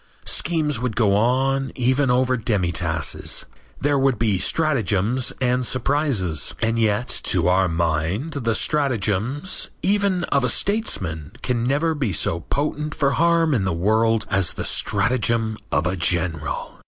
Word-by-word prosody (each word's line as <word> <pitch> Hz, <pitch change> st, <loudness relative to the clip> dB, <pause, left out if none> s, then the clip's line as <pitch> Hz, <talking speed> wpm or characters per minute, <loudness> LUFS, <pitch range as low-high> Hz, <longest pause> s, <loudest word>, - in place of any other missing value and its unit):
Schemes 155 Hz, -6 st, -1 dB
would 125 Hz, -3 st, -3 dB
go 105 Hz, -4 st, +3 dB
on 135 Hz, +5 st, +1 dB
even 130 Hz, +2 st, +1 dB
over 130 Hz, +1 st, +2 dB
demitasses. 85 Hz, -, 0 dB, 0.3 s
There 145 Hz, 0 st, +1 dB
would 135 Hz, -3 st, +2 dB
be 105 Hz, -5 st, +1 dB
stratagems 125 Hz, -, +1 dB
and 125 Hz, 0 st, +1 dB
surprises. 125 Hz, -, 0 dB
And 115 Hz, +1 st, 0 dB
yet 110 Hz, +2 st, +1 dB, 0.2 s
to 90 Hz, -2 st, +1 dB
our 95 Hz, +1 st, +3 dB
mind 85 Hz, -, -1 dB
the 115 Hz, -5 st, 0 dB
stratagem, 125 Hz, -3 st, 0 dB, 0.4 s
even 200 Hz, -2 st, +1 dB
of 140 Hz, -2 st, +1 dB
a 125 Hz, -, +2 dB
statesman, 95 Hz, -, -1 dB
can 120 Hz, -2 st, -1 dB
never 150 Hz, +5 st, +1 dB
be 135 Hz, -10 st, -2 dB
so 85 Hz, 0 st, 0 dB
potent 150 Hz, -, -3 dB
for 140 Hz, -2 st, +1 dB
harm 165 Hz, +1 st, +2 dB
in 115 Hz, -7 st, +1 dB
the 95 Hz, -2 st, 0 dB
world 110 Hz, +5 st, +1 dB
as 95 Hz, -3 st, +1 dB
the -, -, -4 dB
stratagem 110 Hz, +1 st, 0 dB, 0.2 s
of 75 Hz, +4 st, +1 dB
a 90 Hz, +1 st, 0 dB
general. 85 Hz, -3 st, -1 dB
115 Hz, 140 wpm, -22 LUFS, 95-140 Hz, 0.4 s, go